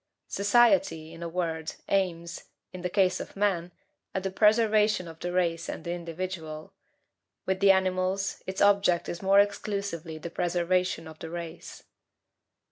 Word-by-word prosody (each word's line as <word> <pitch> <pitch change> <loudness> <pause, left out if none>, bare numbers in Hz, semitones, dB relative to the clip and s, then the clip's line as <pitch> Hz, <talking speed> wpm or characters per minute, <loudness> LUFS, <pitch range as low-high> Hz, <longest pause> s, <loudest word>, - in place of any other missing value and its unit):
Society, 205 - +3
in 165 - -11
a 170 - -4
word, 165 -2 -2
aims, 170 -3 -1 0.3
in 185 - -7
the 180 - -2
case 185 0 +2
of - - -8
man, 190 -4 0 0.4
at 190 - -1
the 190 - -2
preservation 215 -2 +3
of 165 -1 -11
the 175 - -3
race 170 -2 0
and - - -5
the 170 - -4
individual; 165 -2 -6 0.7
with 190 0 0
the 200 0 +5
animals, 190 0 +1
its 190 +1 0
object 200 -4 +3
is 170 - -5
more 195 +1 +5
exclusively 200 -5 -1
the 165 +2 -7
preservation 175 -1 0
of 160 0 -12
the 165 - -7
race. 170 0 -8
180 Hz, 150 wpm, -28 LUFS, 170-195 Hz, 0.7 s, the